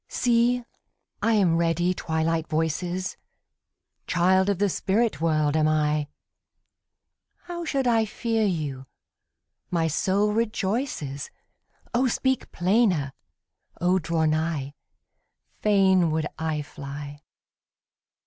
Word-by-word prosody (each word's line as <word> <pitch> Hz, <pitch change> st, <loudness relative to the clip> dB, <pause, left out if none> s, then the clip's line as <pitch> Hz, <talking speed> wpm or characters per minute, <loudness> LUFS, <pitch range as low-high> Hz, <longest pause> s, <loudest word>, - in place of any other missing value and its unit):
See, 240 Hz, 0 st, +2 dB, 0.6 s
I 230 Hz, -, +2 dB
am 185 Hz, -6 st, +3 dB
ready, 170 Hz, +2 st, +1 dB
Twilight 160 Hz, -1 st, -1 dB
voices! 175 Hz, +4 st, -2 dB, 0.9 s
Child 185 Hz, +2 st, +3 dB
of 200 Hz, -, +1 dB
the 205 Hz, +2 st, +2 dB
spirit 200 Hz, -2 st, 0 dB
world 155 Hz, -2 st, +2 dB
am 155 Hz, -1 st, +3 dB
I; 150 Hz, -1 st, +1 dB, 1.4 s
How 345 Hz, -1 st, -6 dB
should 275 Hz, -4 st, 0 dB
I 230 Hz, -2 st, +3 dB
fear 225 Hz, +1 st, -1 dB
you? 150 Hz, -9 st, -2 dB, 0.8 s
my 165 Hz, -2 st, +1 dB
soul 195 Hz, +6 st, +1 dB
rejoices, 210 Hz, -, -2 dB, 0.6 s
O 250 Hz, +2 st, +3 dB
speak 260 Hz, +2 st, -1 dB
plainer! 180 Hz, -, +2 dB, 0.7 s
O 180 Hz, +2 st, +3 dB
draw 165 Hz, -1 st, 0 dB
nigh! 155 Hz, -3 st, -1 dB, 0.9 s
Fain 190 Hz, -4 st, +4 dB
would 155 Hz, 0 st, 0 dB
I 160 Hz, -2 st, -1 dB
fly! 145 Hz, 0 st, -8 dB
175 Hz, 100 wpm, -25 LUFS, 155-210 Hz, 1.4 s, Fain